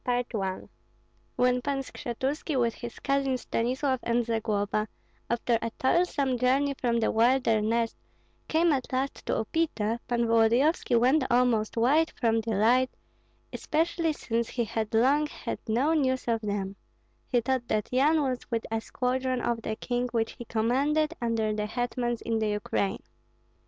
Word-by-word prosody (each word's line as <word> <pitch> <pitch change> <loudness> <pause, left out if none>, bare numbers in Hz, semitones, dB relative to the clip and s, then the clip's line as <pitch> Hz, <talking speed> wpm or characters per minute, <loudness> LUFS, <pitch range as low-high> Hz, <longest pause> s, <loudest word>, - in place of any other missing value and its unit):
CHAPTER 245 -2 -1
XIII. 190 -1 -4 0.7
When 250 0 +2
Pan 280 +1 -1
Skshetuski 265 +3 -3
with 235 -2 +1
his 240 -1 -8
cousin 275 -1 0
Stanislav 255 +3 -1
and 235 0 0
Zagloba, 215 -2 -1 0.4
after 235 0 +1
a 230 - -2
toilsome 275 -4 +1
journey 270 +3 +2
from 240 -3 0
the 225 - +1
wilderness, 230 -1 +2 0.5
came 330 +1 +3
at 260 -3 -3
last 265 +2 -2
to - - +1
Upita, 230 -4 -1
Pan 235 -1 +1
Volodyovski 235 +3 +3
went 260 +5 +3
almost 240 -3 +2
wild 290 +8 +3
from 225 -1 +2
delight, 230 +4 +2 0.6
especially 330 +1 0
since 230 -4 -2
he 240 - -1
had 220 -1 -3
long 280 +6 +3
had - - -6
no 255 +8 +2
news 260 -5 0
of 230 -1 +1
them; 200 -2 -3 0.5
he 245 - +2
thought 245 0 -1
that 215 -2 -1
Yan 295 +5 +3
was 255 -2 -1
with 230 -2 -2
a 225 0 0
squadron 255 +1 -1
of 235 -1 -1
the 220 - -3
king 245 +2 -2
which 225 -2 0
he 240 - -10
commanded 280 +8 +1
under 225 -2 0
the 210 0 -2
hetmans 240 +1 -2
in 225 -1 0
the 220 - 0
Ukraine. 210 +2 -1
240 Hz, 150 wpm, -28 LUFS, 225-265 Hz, 0.7 s, came